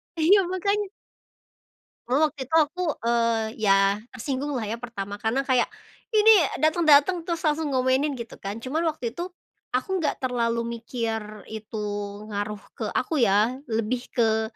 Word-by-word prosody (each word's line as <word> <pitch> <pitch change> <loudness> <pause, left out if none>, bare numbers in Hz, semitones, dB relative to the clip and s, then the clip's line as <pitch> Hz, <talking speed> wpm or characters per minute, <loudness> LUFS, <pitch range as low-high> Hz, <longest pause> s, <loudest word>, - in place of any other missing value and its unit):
iya, 365 +4 +5
makanya. 400 +2 -1 1.2
Cuma 255 - +2
waktu 285 - -14
itu 320 - -3
aku, 325 +4 +2 0.2
eee, 230 -1 +2 0.2
ya 195 0 +3
tersinggung 270 +3 -3
lah 225 - -2
ya, 225 +3 -3
pertama, 205 -4 -6
karena 235 +5 +1
kayak 255 -3 +2 0.4
ini 440 0 +7 0.3
dateng-dateng 315 +1 +4
terus 335 -1 -3
langsung 305 -1 +1
ngomenin 260 +2 +1
gitu 230 -1 -7
kan. 200 +3 -5
Cuma 275 +8 -2
waktu 280 -8 -2
itu 355 +2 -5 0.4
aku 340 +8 -1
nggak 290 - 0
terlalu 235 -2 0
mikir 225 -3 -4
itu 220 0 -7 0.5
ngaruh 205 0 -3 0.2
ke - - -3
aku 305 -6 0
ya, 210 +4 +3 0.2
lebih 230 +3 -2
ke 220 -2 +2
250 Hz, 145 wpm, -25 LUFS, 225-310 Hz, 1.2 s, ini